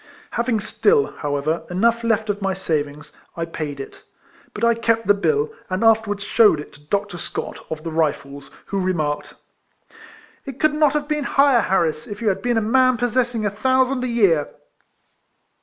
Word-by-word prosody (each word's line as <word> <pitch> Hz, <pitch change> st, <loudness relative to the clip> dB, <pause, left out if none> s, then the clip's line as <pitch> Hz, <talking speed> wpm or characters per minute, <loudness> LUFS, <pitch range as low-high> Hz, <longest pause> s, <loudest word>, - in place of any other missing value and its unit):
Having 235 Hz, -1 st, 0 dB
stiU, 420 Hz, -, +1 dB
however, 145 Hz, +3 st, -1 dB
enough 230 Hz, +6 st, +1 dB
left 220 Hz, -2 st, +1 dB
of 205 Hz, 0 st, -7 dB
my 195 Hz, -1 st, -1 dB
savings, 150 Hz, -4 st, -3 dB, 0.3 s
I 165 Hz, -, -1 dB
paid 150 Hz, -4 st, -6 dB
it; 135 Hz, -, -9 dB, 0.5 s
but 210 Hz, -, -7 dB
I 235 Hz, 0 st, +5 dB
kept 230 Hz, -1 st, 0 dB
the 205 Hz, -, +5 dB
bill, 440 Hz, -, 0 dB, 0.2 s
and 185 Hz, +3 st, -1 dB
afterwards 220 Hz, -2 st, +2 dB
shewed 210 Hz, -7 st, +4 dB
it 150 Hz, -, -9 dB
to 145 Hz, -, -18 dB
Dr. 200 Hz, +2 st, -2 dB
Scott, -, -, -5 dB
of 155 Hz, -1 st, -5 dB
the 165 Hz, -, -4 dB
Rifles, 145 Hz, -3 st, -2 dB, 0.2 s
who 200 Hz, -, -3 dB
remarked 160 Hz, -6 st, -2 dB, 0.3 s
— -, -, -24 dB
" -, -, -27 dB
It 270 Hz, -1 st, -7 dB
could 310 Hz, -1 st, +3 dB
not 300 Hz, -2 st, +3 dB
have 295 Hz, -1 st, -1 dB
been 300 Hz, -2 st, -1 dB
higher, 275 Hz, -4 st, +4 dB
Harris, 165 Hz, -5 st, 0 dB
if 205 Hz, 0 st, -7 dB
you 225 Hz, -, +1 dB
had 195 Hz, 0 st, -1 dB
been 240 Hz, +1 st, 0 dB
a -, -, +2 dB
man 255 Hz, +3 st, +3 dB
possessing 240 Hz, -1 st, 0 dB
a 205 Hz, -, 0 dB
thousand 260 Hz, +4 st, +1 dB
a -, -, -1 dB
year." 195 Hz, -11 st, +2 dB
210 Hz, 185 wpm, -21 LUFS, 165-245 Hz, 0.5 s, I